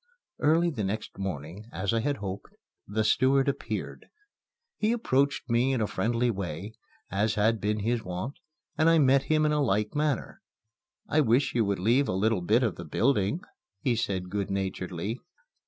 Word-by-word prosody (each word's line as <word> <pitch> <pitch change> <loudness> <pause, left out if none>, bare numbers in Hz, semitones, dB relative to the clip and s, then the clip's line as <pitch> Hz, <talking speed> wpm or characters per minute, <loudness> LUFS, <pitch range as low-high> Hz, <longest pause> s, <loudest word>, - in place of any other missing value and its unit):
Early 165 +3 +3
the 115 -8 -3
next 105 +2 -4
morning, 95 +2 -5
as 100 +3 -1
I 115 - +2
had 145 +4 -1
hoped, 100 -1 -6 0.3
the 110 +2 0
steward 130 +5 +3
appeared. 140 - -3 0.7
He 215 +2 +2
approached 140 - +1
me 125 +2 +2
in 130 - 0
a 110 - +2
friendly 115 +5 0
way 95 0 -5 0.4
(as 105 +3 +1
had 110 +1 +2
been 105 0 0
his 115 +2 0
wont) 90 +9 -5 0.4
and 160 +1 +5
I 165 - +5
met 135 -2 +4
him 155 -1 +3
in 150 - +2
a 150 0 +2
like 105 -4 +1
manner. 150 -3 -1 0.7
"I 155 - +3
wish 125 +1 +2
you 115 -3 +2
would 100 -1 0
leave 120 +9 +2
a - - -1
little 105 +1 +1
bit 110 +8 +3
of 110 -6 -1
the 85 - -6
building," 105 - +1 0.4
he 120 +4 +1
said 95 -5 -2
good 100 -1 -2
naturedly. 95 +2 -3
110 Hz, 175 wpm, -28 LUFS, 100-135 Hz, 0.7 s, and